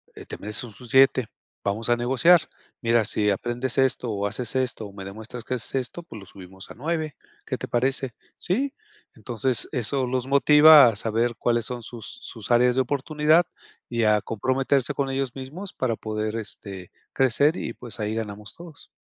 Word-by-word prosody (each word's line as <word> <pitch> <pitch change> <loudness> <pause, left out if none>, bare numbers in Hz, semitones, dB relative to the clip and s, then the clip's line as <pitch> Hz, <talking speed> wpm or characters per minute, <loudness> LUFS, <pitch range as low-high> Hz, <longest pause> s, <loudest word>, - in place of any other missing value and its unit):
eh, - - -10
te - - -7
mereces 105 +4 -3
un 115 - -12 0.2
7, 130 -2 +4 0.4
vamos 100 +3 -1
a 120 - +5
negociar, 135 +8 +4 0.4
mira, 115 -1 +2
si 105 0 +1
aprendes 120 +5 -3
esto, 130 -3 +1
o 100 -1 -1
haces 120 +4 -2
esto, 125 -4 -1
o 100 - -14
me 95 -1 -9
demuestras 110 +4 -8
que - - -3
haces 120 - -4
esto, 135 +6 -3
pues, 115 -10 -11
lo 100 - -12
subimos 95 0 -12
a - - -10
9, 155 +2 -3 0.3
¿qué - - -3
te - - -6
parece?", 130 +1 0 0.2
"Sí", 265 +10 -1 0.4
entonces 120 0 -1
eso 130 0 0
los 130 0 -2
motiva 150 +1 +8
a 115 - +1
saber 115 +2 0
cuáles 120 0 +1
son 125 0 -4
sus 115 -2 -9
sus 110 -1 -8
áreas 125 +1 +4
de 130 - +3
oportunidad 150 +5 +2 0.4
y 115 -1 -1
a 105 -1 +4
comprometerse 130 +5 0
con 140 -1 -1
ellos 135 -2 -2
mismos 155 +9 -7
para 120 -3 -1
poder, 110 0 -3
este, 100 -4 -7 0.2
crecer 135 +5 +3
y, - - -4
pues, 115 -3 -6
ahí 105 +1 -2
ganamos 105 -1 -6
todos. 170 -3 -12
120 Hz, 185 wpm, -24 LUFS, 110-135 Hz, 0.4 s, motiva